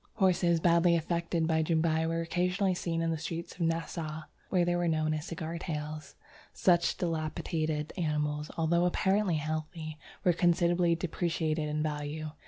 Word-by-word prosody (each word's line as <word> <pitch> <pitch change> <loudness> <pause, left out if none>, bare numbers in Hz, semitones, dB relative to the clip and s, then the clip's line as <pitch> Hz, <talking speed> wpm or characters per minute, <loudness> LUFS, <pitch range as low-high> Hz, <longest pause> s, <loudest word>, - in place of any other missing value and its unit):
Horses 175 -3 +3
badly 170 +1 +4
affected 170 0 0
by 160 0 +2
Jumbai 160 0 +1
were 165 0 0
occasionally 180 +3 +1
seen 165 -2 -2
in 165 - +1
the 160 - -2
streets 170 +2 -5
of 180 - -11
Nassau, 165 -1 -2 0.3
where 180 -2 +3
they 175 0 +1
were 175 0 +1
known 155 -1 +1
as 155 +2 -4
'cigar 170 0 -4
tails.' 155 -2 -5 0.4
Such 175 -2 +3
depilated 155 -2 -2
animals, 150 -3 -1
although 170 +2 +2
apparently 190 +1 +2
healthy, 155 +1 -4 0.2
were 180 - +4
considerably 175 0 +3
depreciated 160 -2 -1
in 150 0 -1
value. 150 0 -3
165 Hz, 150 wpm, -30 LUFS, 155-175 Hz, 0.4 s, badly